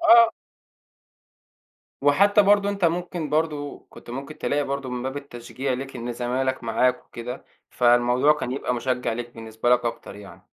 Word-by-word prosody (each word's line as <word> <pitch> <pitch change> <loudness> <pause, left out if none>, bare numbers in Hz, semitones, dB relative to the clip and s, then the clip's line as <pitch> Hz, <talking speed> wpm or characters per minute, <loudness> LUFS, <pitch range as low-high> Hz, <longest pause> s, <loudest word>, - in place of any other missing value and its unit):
آه. 230 -7 +7 1.7
وحتى 200 +9 +5
برضو 200 0 +4
أنت 200 -2 -1
ممكن 170 -2 -1
برضو 150 -2 -1
كنت - - -13
ممكن 140 +5 -7
تلاقي 145 +1 0
برضو 140 -1 -3
من 125 -1 -4
باب 130 +2 -4
التشجيع 130 -1 -5
لَك، 135 +1 -5
إن 120 0 -4
زمايلك 125 +2 -2
معاك 125 +2 +1
وكده، 125 +2 -7 0.3
فالموضوع 120 +3 +4
كان 150 -4 -4
يبقى 130 -2 -2
مُشجِّع 125 0 -1
لَك 120 +1 -5
بالنسبة 110 +1 -3
لَك 125 0 +4
أكتر 115 -3 -4
يعني. 100 -1 -13
130 Hz, 155 wpm, -24 LUFS, 120-150 Hz, 1.7 s, آه